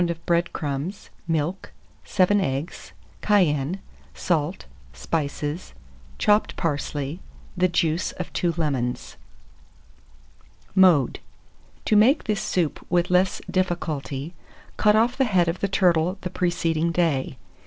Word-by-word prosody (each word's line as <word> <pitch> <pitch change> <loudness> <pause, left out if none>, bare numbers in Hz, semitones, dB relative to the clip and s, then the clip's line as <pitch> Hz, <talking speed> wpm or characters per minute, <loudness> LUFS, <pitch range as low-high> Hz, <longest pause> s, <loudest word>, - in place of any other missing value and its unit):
of 165 -1 -5
bread 170 0 +1
crumbs, 150 +6 -4 0.2
milk, 165 +3 -2 0.3
7 200 +1 +3
eggs, 140 0 -4 0.3
cayenne, 175 -4 +2 0.4
salt, 165 +1 -1 0.3
spices, 150 - -3 0.4
chopped 210 +1 +2
parsley, 145 -1 -2 0.4
the 185 0 +3
juice 170 0 0
of 180 - -7
2 170 -2 0
lemons. 130 -6 -2 1.6
Mode. 180 -9 +4 0.7
To 215 - +2
make 235 +9 +5
this 210 -2 -1
soup 170 -5 -1
with 175 0 +1
less 185 +1 +2
difficulty, 165 -5 -2 0.4
cut 210 -1 +4
off 235 +3 +3
the 270 - +3
head 185 -7 +2
of 165 +2 -2
the 200 - 0
turtle 180 -1 +2
the 180 - -5
preceding 170 -2 0
day. 155 -7 0
170 Hz, 115 wpm, -24 LUFS, 150-185 Hz, 1.6 s, make